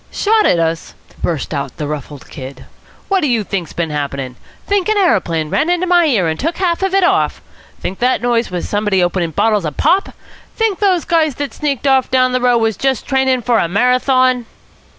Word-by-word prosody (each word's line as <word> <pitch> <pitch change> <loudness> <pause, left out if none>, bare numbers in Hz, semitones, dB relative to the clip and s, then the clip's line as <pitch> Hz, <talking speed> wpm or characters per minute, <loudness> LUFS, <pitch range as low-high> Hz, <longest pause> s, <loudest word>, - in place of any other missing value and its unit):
"Shot 430 +1 +2
at - - +3
us!" 165 0 -2 0.3
burst 160 -2 -2
out 140 -3 -4
the 150 - -3
ruffled 145 -1 -7
Kid. 130 -1 -9 0.4
"What 390 -1 +1
do 300 - +1
you 235 -4 +1
think's 185 -4 -4
bin 165 -2 -3
happening? 140 -3 -4 0.3
Think 405 0 0
an 430 - +2
aeroplane 165 - +1
ran 315 - +1
into 355 +1 +1
my 350 -1 +4
ear 220 - +2
and 160 0 -2
took 330 +4 -2
half 355 -2 0
of 385 0 0
it 390 - +3
off? 385 +2 +1 0.4
Think 190 - -5
the 250 +1 +2
noise 235 +1 0
was 180 -1 -4
somebody 205 -3 +1
opening 175 -1 0
bottles 210 +5 +1
of 150 -3 -5
pop? 385 +2 +2 0.5
Think 445 -4 0
those 375 -5 +2
guys 315 -5 +1
that 285 +1 -4
sneaked 285 -3 -3
off 265 -2 +3
down 255 -1 +2
the 255 0 0
road 245 -1 +3
was 225 -3 0
just 265 -3 -1
training 265 -2 +1
for 235 -1 +2
a - - +1
Marathon?" 250 +4 +2
245 Hz, 205 wpm, -16 LUFS, -, 0.5 s, my